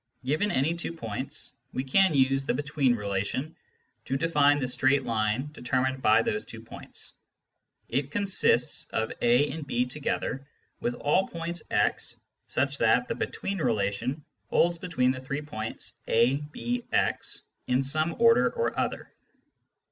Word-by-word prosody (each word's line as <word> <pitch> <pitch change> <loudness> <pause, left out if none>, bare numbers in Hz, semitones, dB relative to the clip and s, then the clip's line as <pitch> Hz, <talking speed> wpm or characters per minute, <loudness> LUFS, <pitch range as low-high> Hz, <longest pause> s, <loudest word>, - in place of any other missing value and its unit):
Given 155 +10 +1
any 135 +3 +1
two 170 0 -4
points, 135 0 -3 0.2
we 130 - -1
can 160 +5 +3
use 135 0 +3
the - - 0
between 145 -3 +1
relation 105 +8 -2 0.5
to 135 - -1
define 145 -2 +4
the 135 -3 -1
straight 135 +2 +2
line 110 +5 0
determined 130 -1 -1
by 115 0 +5
those 105 -1 -1
two - - -10
points; - - -6 0.7
it 135 0 -1
consists 190 -9 +1
of 110 0 -1
a 120 +5 +4
and 150 0 -6
b 125 -2 +1
together 135 0 -3 0.3
with 120 - -1
all 165 +9 +2
points 170 0 -4
x, - - 0 0.3
such 140 +1 0
that 115 +2 +3
the - - +1
between 195 -1 -3
relation 120 +3 -1 0.2
holds 170 0 +2
between 165 -8 +1
the 130 0 -5
three 140 +2 -4
points 110 -6 -5
a, 120 +4 +4
b, 245 +8 -3
x - - 0 0.2
in 125 +1 +2
some 155 +4 0
order 230 +1 +5
or 475 0 -1
other. - - -3
135 Hz, 150 wpm, -28 LUFS, 125-155 Hz, 0.7 s, by